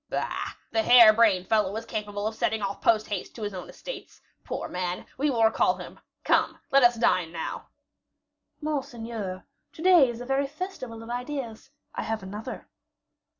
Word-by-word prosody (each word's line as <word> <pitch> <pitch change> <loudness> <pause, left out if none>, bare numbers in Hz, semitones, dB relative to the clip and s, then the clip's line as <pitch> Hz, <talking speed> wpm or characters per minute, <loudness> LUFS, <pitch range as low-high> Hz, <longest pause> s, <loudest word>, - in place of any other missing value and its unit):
"Bah! - - -3 0.2
the 225 - +2
hair 235 -2 +8
brained 210 -5 +3
fellow 210 -2 +2
is 225 +1 -4
capable 205 -1 -4
of 220 - -1
setting 220 -1 -1
off 200 0 -3
post 220 -1 +3
haste 205 -3 -5
to 225 - -7
his 205 -1 -3
own 180 -1 -7
estates. - - -9 0.2
Poor - - -4
man! 180 0 -3
we 290 +3 +1
will 235 -4 +2
recall 220 - +3
him. - - -10 0.2
Come, - - +2
let 275 - +6
us 240 -1 +6
dine 185 -7 +2
now." 165 -1 -5 0.9
"Monseigneur, 230 - -4 0.3
to - - -11
day 355 -8 +7
is 235 -1 -6
a 245 - -6
very 270 +2 +1
festival 280 -8 -7
of 230 - -8
ideas; 250 -2 -5 0.2
I - - -3
have 220 -2 -3
another." 205 +3 -7
225 Hz, 175 wpm, -27 LUFS, 205-250 Hz, 0.9 s, hair